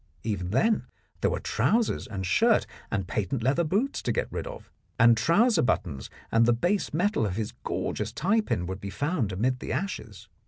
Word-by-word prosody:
Even 95 Hz, -5 st, -2 dB
then 215 Hz, -, +2 dB, 0.3 s
there -, -, +3 dB
were -, -, -1 dB
trousers 230 Hz, +1 st, +1 dB
and 95 Hz, -3 st, -4 dB
shirt 90 Hz, -, +3 dB, 0.2 s
and 95 Hz, -3 st, -2 dB
patent 110 Hz, +4 st, -2 dB
leather 140 Hz, +7 st, +2 dB
boots 205 Hz, -, 0 dB
to -, -, -1 dB
get -, -, -1 dB
rid -, -, -4 dB
of, -, -, -10 dB, 0.3 s
and 115 Hz, -1 st, +7 dB
trouser 200 Hz, -, +3 dB
buttons 80 Hz, -, -1 dB, 0.2 s
and 115 Hz, +1 st, +4 dB
the 120 Hz, -, +5 dB
base 175 Hz, -, 0 dB
metal 185 Hz, -, +1 dB
of 100 Hz, -4 st, -1 dB
his 110 Hz, -1 st, -2 dB
gorgeous -, -, -2 dB
tie 205 Hz, +7 st, +2 dB
pin 90 Hz, -, -2 dB
would 95 Hz, +2 st, -5 dB
be 100 Hz, -, -5 dB
found 145 Hz, -, -1 dB
amid 125 Hz, +7 st, 0 dB
the -, -, -5 dB
ashes. 115 Hz, -, -4 dB
120 Hz, 190 wpm, -27 LUFS, -, 0.3 s, and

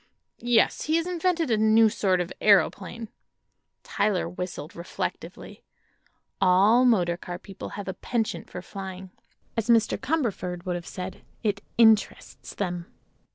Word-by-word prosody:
"Yes; 240 Hz, -1 st, +2 dB
he 315 Hz, -, +1 dB
has 335 Hz, 0 st, +1 dB
invented 350 Hz, -4 st, 0 dB
a 220 Hz, -, +3 dB
new 220 Hz, +1 st, +5 dB
sort 195 Hz, -4 st, +1 dB
of 180 Hz, -, -5 dB
aëroplane." 205 Hz, +2 st, +2 dB, 0.7 s
Tyler 200 Hz, -4 st, 0 dB
whistled, 175 Hz, -3 st, -6 dB
reflectively. 170 Hz, +1 st, -6 dB, 0.8 s
All 195 Hz, +7 st, +5 dB
motor 180 Hz, -8 st, +3 dB
car 175 Hz, -1 st, -7 dB
people 195 Hz, +1 st, -9 dB
have 205 Hz, -, -6 dB
a 190 Hz, -, -2 dB
penchant 220 Hz, -8 st, -3 dB
for 180 Hz, -, -7 dB
flying. 190 Hz, 0 st, -8 dB, 0.4 s
As 230 Hz, 0 st, -2 dB
Mr. 230 Hz, -2 st, +3 dB
Cumberford 215 Hz, -, -2 dB
would 180 Hz, -, -1 dB
have 175 Hz, -1 st, -6 dB
said: 185 Hz, 0 st, -7 dB, 0.2 s
it 205 Hz, -2 st, 0 dB, 0.2 s
"interests 220 Hz, -2 st, +2 dB
them." 175 Hz, -3 st, -3 dB
205 Hz, 135 wpm, -26 LUFS, 180-230 Hz, 0.8 s, new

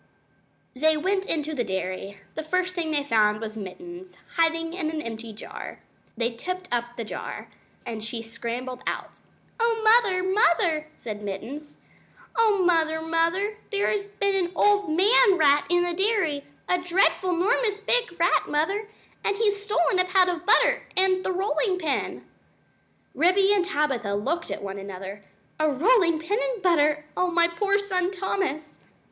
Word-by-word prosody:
They 310 Hz, +4 st, +2 dB
went 385 Hz, +4 st, 0 dB
into 310 Hz, -1 st, -1 dB
the 250 Hz, -5 st, -1 dB
dairy. 190 Hz, 0 st, -4 dB, 0.2 s
The 315 Hz, -, -4 dB
first 365 Hz, +3 st, -1 dB
thing 340 Hz, -3 st, -2 dB
they 295 Hz, -2 st, 0 dB
found 215 Hz, -5 st, +2 dB
was 220 Hz, -1 st, -6 dB
Mittens, 350 Hz, -, -9 dB, 0.2 s
hiding 330 Hz, 0 st, +1 dB
in 340 Hz, -4 st, -2 dB
an 315 Hz, 0 st, -3 dB
empty 230 Hz, -4 st, -6 dB
jar. 215 Hz, -, -9 dB, 0.4 s
They 235 Hz, +1 st, 0 dB
tipped 365 Hz, +9 st, -5 dB
over 240 Hz, 0 st, 0 dB
the 230 Hz, -, -3 dB
jar, 215 Hz, -, -7 dB, 0.4 s
and 225 Hz, -2 st, -5 dB
she 230 Hz, +1 st, -4 dB
scrambled 235 Hz, +3 st, -5 dB
out. -, -, -4 dB, 0.4 s
"Oh, 460 Hz, 0 st, +2 dB
Mother, 435 Hz, -5 st, +4 dB
Mother!" 345 Hz, -5 st, +2 dB
said 210 Hz, -3 st, -7 dB
Mittens 240 Hz, +10 st, -7 dB, 0.5 s
"Oh! 430 Hz, -4 st, +3 dB
Mother, 320 Hz, -2 st, +2 dB
Mother, 335 Hz, +6 st, 0 dB
there 405 Hz, -1 st, +1 dB
has 405 Hz, -1 st, -2 dB
been 400 Hz, -1 st, -1 dB
an 365 Hz, -3 st, 0 dB
old 410 Hz, 0 st, +3 dB
man 390 Hz, +4 st, +5 dB
rat 290 Hz, -2 st, +4 dB
in 350 Hz, 0 st, +3 dB
the 350 Hz, 0 st, -1 dB
dairy 380 Hz, -7 st, 0 dB, 0.2 s
a 360 Hz, -, +2 dB
dreadful 360 Hz, 0 st, +2 dB
'normous 420 Hz, +3 st, +1 dB
big 420 Hz, -3 st, -1 dB
rat, 345 Hz, +2 st, +3 dB
Mother; 390 Hz, +8 st, -1 dB, 0.4 s
and 405 Hz, -, +1 dB
he's 410 Hz, -1 st, 0 dB
stolen 375 Hz, -3 st, +1 dB
a 365 Hz, -, +3 dB
pat 370 Hz, 0 st, +3 dB
of 355 Hz, 0 st, -3 dB
butter -, -, +4 dB, 0.2 s
and 375 Hz, 0 st, +3 dB
the -, -, -1 dB
rolling 380 Hz, +1 st, 0 dB
pin." 320 Hz, -6 st, -2 dB, 0.9 s
Ribby 375 Hz, +7 st, +4 dB
and 395 Hz, -3 st, +2 dB
Tabitha 270 Hz, -, -1 dB
looked 300 Hz, +12 st, -2 dB
at -, -, -5 dB
one 195 Hz, 0 st, -5 dB
another. 195 Hz, +1 st, -8 dB, 0.4 s
"A 310 Hz, 0 st, +3 dB
rolling 340 Hz, -, +3 dB
pin 335 Hz, +8 st, -2 dB
and -, -, -3 dB
butter! 300 Hz, -4 st, +3 dB
Oh, 365 Hz, 0 st, +1 dB
my 340 Hz, -1 st, +3 dB
poor 400 Hz, +4 st, +1 dB
son 375 Hz, -3 st, 0 dB
Thomas!" 370 Hz, -5 st, -3 dB
340 Hz, 160 wpm, -25 LUFS, 285-390 Hz, 0.9 s, man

